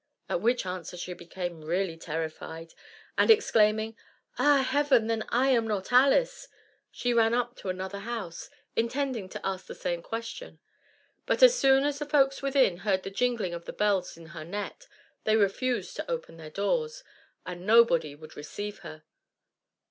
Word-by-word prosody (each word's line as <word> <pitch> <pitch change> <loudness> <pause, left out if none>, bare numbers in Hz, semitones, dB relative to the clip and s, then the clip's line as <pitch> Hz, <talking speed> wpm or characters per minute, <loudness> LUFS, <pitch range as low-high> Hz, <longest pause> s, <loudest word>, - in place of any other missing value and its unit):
At 175 - -1
which 240 0 +1
answer 180 -1 -5
she 180 +1 -5
became 175 -1 -6
really 175 +2 -1
terrified, 165 0 -6 0.5
and - - +4
exclaiming, 220 - +4 0.4
"Ah, 285 -2 +5
heaven, 275 -4 +3
then 225 -1 -1
I 255 +3 +2
am 235 -4 +3
not 205 -1 -3
Alice!" - - +4 0.4
she 245 0 -1
ran 230 0 +4
up 245 0 -1
to 190 - -6
another 190 +2 -4
house, 200 -6 -6 0.3
intending 235 -3 -1
to - - -7
ask 190 -1 -3
the - - -8
same 175 -2 -3
question. 230 - -7 0.7
But - - +2
as - - +9
soon 270 - +4
as 290 0 -1
the 295 - -4
folks 275 -2 +3
within 270 -9 +3
heard 190 -1 0
the 195 - -6
jingling 230 -4 0
of 170 0 -7
the - - -7
bells 195 -5 0
in 165 -1 -13
her 160 -2 -7
net, 205 - -6 0.4
they 215 - +3
refused 245 - 0
to - - -5
open 485 - -4
their 160 -1 -9
doors, 465 - -1 0.4
and 180 +1 -7
nobody 210 -10 +5
would 155 +1 -13
receive 205 +8 -6
her. 155 0 -10
215 Hz, 165 wpm, -28 LUFS, 180-260 Hz, 0.7 s, as